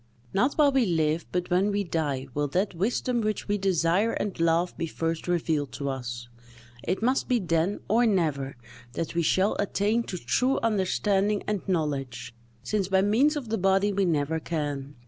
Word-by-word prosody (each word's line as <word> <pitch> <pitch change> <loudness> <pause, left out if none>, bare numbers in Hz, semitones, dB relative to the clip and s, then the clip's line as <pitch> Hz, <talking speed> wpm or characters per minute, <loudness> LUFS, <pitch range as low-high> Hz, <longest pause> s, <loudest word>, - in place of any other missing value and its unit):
Not 250 +9 +2
while 295 -2 +5
we 265 -5 +2
live, 160 -1 0
but 180 0 -2
when 185 +3 +3
we 205 0 0
die, 150 -7 -2
will 145 0 0
that 185 +8 -1
wisdom 235 +6 0
which 215 -1 -2
we 205 0 0
desire 190 +3 +2
and 200 -4 -3
love 170 +2 +2
be 165 - -3
first 165 +1 -3
revealed 160 -6 0
to 140 +2 -3
us; 120 -3 -5 0.6
it 185 +5 -2
must 255 +3 +1
be 250 - +3
then, 175 -1 0
or 230 +4 +3
never, 150 - 0 0.4
that 165 - -3
we 170 - +1
shall 190 +5 +2
attain 205 +3 +1
to 180 - -5
true 250 - +1
understanding 205 -1 +1
and 210 -3 -1
knowledge, 135 -9 -2 0.3
since 205 -3 -1
by 190 0 +3
means 250 +10 +3
of 270 -6 -5
the 225 -1 -1
body 195 +2 +2
we 195 0 +1
never 160 -1 0
can. 145 -4 -4
180 Hz, 180 wpm, -27 LUFS, 155-205 Hz, 0.6 s, while